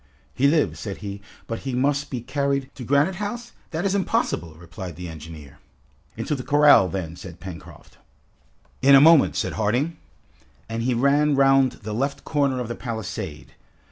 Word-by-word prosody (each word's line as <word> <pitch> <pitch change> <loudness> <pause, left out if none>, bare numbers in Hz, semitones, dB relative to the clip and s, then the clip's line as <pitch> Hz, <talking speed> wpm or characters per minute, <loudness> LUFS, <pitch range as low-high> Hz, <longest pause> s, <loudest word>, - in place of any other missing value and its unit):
"He 140 - +3
lives," 155 +1 +1
said 100 -3 -5
he, 100 0 -6 0.2
"but 115 - -4
he 130 -2 -4
must 140 +3 0
be 125 -3 -4
carried 140 +1 -1
" - - -40
"To 130 - -9
Granite 145 +8 +2
House? 235 +4 -5 0.2
that 160 +4 -3
is 195 - +1
impossible!" 85 - -1
replied 90 +2 -9
the 90 0 -7
engineer. 80 -3 -11 0.6
"Into - - -2
the 135 - -3
corral, 145 -6 +5
then!" 85 -3 -4
said 90 -1 -11
Pencroft. 90 -4 -11 0.8
"In 140 +1 +7
a - - +9
moment," 160 +1 +6
said - - -1
Harding. 125 +10 0 0.7
And 115 +1 -3
he 125 +1 0
ran 140 +4 +3
round 135 -1 +4
the 105 +1 -5
left 140 +5 -2
corner 140 -4 0
of 125 - -3
the 120 - -4
palisade. 110 - -6
130 Hz, 170 wpm, -23 LUFS, 100-145 Hz, 0.8 s, a